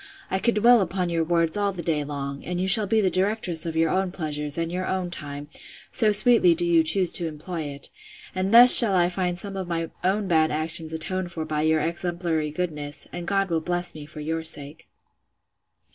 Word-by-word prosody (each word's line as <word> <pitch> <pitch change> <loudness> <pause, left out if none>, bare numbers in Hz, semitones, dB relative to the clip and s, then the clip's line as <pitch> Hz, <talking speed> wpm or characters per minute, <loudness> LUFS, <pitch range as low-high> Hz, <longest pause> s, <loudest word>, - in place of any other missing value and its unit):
I 190 - -1
could 235 +2 0
dwell 235 +2 +4
upon 180 0 -3
your 165 -1 -1
words 165 0 -1
all 205 -1 -1
the 175 -2 -8
day 155 -2 -2
long; 140 -1 -7
and 180 0 -5
you 185 - -2
shall 205 +2 +2
be 220 +2 +1
the 190 -2 0
directress 185 -4 -1
of 165 - -5
your 160 0 0
own 190 -1 -1
pleasures, 150 -4 -5
and 165 0 -3
your 185 +1 -4
own 185 -2 -3
time, 145 -3 -8 0.4
so 215 -2 +1
sweetly 210 -4 +3
do 175 - -1
you 170 -1 +3
choose 175 +3 +2
to 170 - +3
employ 160 +1 -7
it: 140 -1 -4 0.4
and 185 +1 -3
thus 240 +2 +11
shall 215 -6 +9
I 175 -1 +2
find 180 -1 -3
some 195 +2 -7
of 190 -2 -6
my 165 -1 -4
own 195 +2 -1
bad 160 -3 +1
actions 155 +1 -3
atoned 175 +3 -5
for 160 -2 -6
by 155 -1 -3
your 160 0 +1
exemplary 170 -2 -3
goodness, 150 -3 -6
and 175 -1 -7
God 195 -1 -1
will 165 -1 -1
bless 175 +1 -1
me 150 -2 -11
for 155 0 -11
your 160 +2 -4
sake. 150 -1 -2
170 Hz, 215 wpm, -23 LUFS, 155-185 Hz, 0.4 s, thus